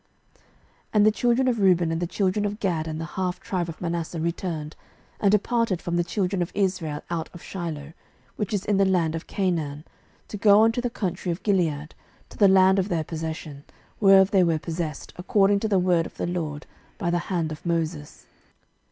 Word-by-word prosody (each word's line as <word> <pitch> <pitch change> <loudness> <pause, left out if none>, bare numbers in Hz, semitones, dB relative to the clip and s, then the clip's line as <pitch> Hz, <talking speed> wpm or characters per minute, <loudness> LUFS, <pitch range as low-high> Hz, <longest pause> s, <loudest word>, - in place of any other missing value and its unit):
06:022:009 - - -36 0.5
And 210 -1 +5
the 215 - +6
children 245 +3 +1
of 240 -3 +1
Reuben 180 -4 +3
and 165 +1 -2
the 175 - -1
children 190 +3 0
of 205 +1 -3
Gad 170 -7 -1
and 155 0 -4
the 165 - -3
half 180 +1 -3
tribe 175 -3 -3
of 160 - -8
Manasseh 170 -1 -3
returned, 165 -2 -3 0.4
and 200 - +3
departed 210 -2 +1
from 175 -1 -3
the 175 - +2
children 185 +1 -1
of 175 - -2
Israel 180 -7 -1
out 165 -2 -2
of 175 - -11
Shiloh, 160 -5 -6 0.4
which 210 - -3
is 205 -3 -1
in 205 -1 +1
the 195 - +4
land 175 -4 +1
of 165 - -6
Canaan, 160 -6 -2 0.4
to 210 - -6
go 205 +1 +6
unto 225 +2 +2
the 245 - -1
country 185 -5 -3
of 170 - -5
Gilead, 160 -7 0 0.4
to - - -14
the 205 - +7
land 190 0 +5
of 190 +2 -1
their 165 -4 0
possession, 160 -2 -6 0.4
whereof 195 -1 +6
they 190 -2 +5
were 165 -2 +2
possessed, 160 -1 -5
according 200 +2 +3
to 220 - -1
the 200 -3 +2
word 180 -2 +2
of - - -18
the - - -2
LORD 160 -4 -4 0.3
by 175 -6 -1
the 175 - +1
hand 170 -4 -1
of 155 - -8
Moses. 165 -3 -3
180 Hz, 205 wpm, -25 LUFS, 165-195 Hz, 0.5 s, the